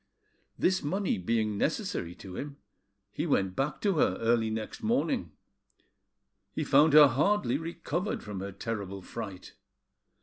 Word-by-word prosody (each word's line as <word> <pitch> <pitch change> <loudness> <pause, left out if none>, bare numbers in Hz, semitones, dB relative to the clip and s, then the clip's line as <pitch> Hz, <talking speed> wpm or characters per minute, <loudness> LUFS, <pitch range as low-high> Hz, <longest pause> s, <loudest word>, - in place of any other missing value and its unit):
This 185 0 +2
money 185 - -1
being 105 +1 0
necessary 85 +1 -2
to 95 -2 -10
him, 140 +4 -6 0.5
he 160 - -3
went 95 - +1
back 140 +3 -1
to 195 -6 +1
her - - +2
early 115 -1 +2
next 110 0 -5
morning. 240 +3 0 1.2
He 155 - -2
found 145 +2 +5
her 150 -1 +10
hardly 140 - +1
recovered 170 +3 -3
from 105 -3 -6
her 100 +1 -5
terrible 100 -2 -5
fright. 100 -5 -7
135 Hz, 135 wpm, -29 LUFS, 105-165 Hz, 1.2 s, her